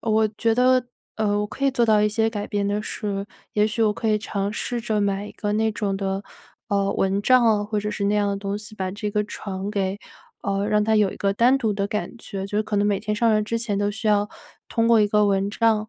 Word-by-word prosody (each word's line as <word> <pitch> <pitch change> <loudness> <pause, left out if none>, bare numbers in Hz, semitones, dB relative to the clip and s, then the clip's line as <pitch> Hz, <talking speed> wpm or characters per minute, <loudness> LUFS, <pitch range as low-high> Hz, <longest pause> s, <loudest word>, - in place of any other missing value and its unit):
我 220 -1 +2
觉 225 +1 +2
得 255 +1 +4 0.3
呃， 205 -2 +1
我 210 - 0
可 270 +6 -5
以 275 - +4
做 240 -3 +1
到 215 -1 +4
一 210 - +3
些 220 +1 +1
改 205 -2 -4
变 205 -1 -1
的 205 +1 -1
是， 200 -2 -3 0.3
也 210 - +3
许 225 +2 -3
我 215 -1 +3
可 220 - -2
以 215 -1 +3
尝 200 -1 -3
试 240 +1 -3
着 220 -2 -1
买 200 0 -1
一 - - -9
个 205 -1 -3
那 220 +1 +1
种 205 -3 -2
的， 195 0 -2 0.4
呃， 200 -1 +1
蚊 195 +1 +1
帐 255 0 +5
啊， 215 -2 +3
或 210 0 -2
者 210 - -2
是 200 - -2
那 205 - +2
样 205 - +2
的 200 - -1
东 200 0 -3
西 215 0 -11
把 190 -2 -3
这 205 +2 -4
个 210 - +2
床 195 -1 -5
给 195 -2 -1 0.5
呃， 200 +1 -1
让 210 -1 +2
它 220 +1 +2
有 205 -3 +3
一 - - -10
个 200 -1 0
单 240 +6 +4
独 225 -6 0
的 200 0 -1
感 210 +3 -4
觉， 195 -4 -6
就 205 +1 -2
是 215 - +2
可 210 - -4
能 205 - +2
每 200 -2 +1
天 210 0 -2
上 225 +2 +2
来 215 - +3
之 230 +2 -2
前 220 -4 -2
都 205 - +1
需 220 +1 -2
要 210 0 +3 0.4
通 230 -1 +1
过 230 -2 +6
一 210 - +4
个 210 0 +3
蚊 195 0 +1
帐， 220 0 +1
210 Hz, 285 characters per minute, -23 LUFS, 200-220 Hz, 0.5 s, 过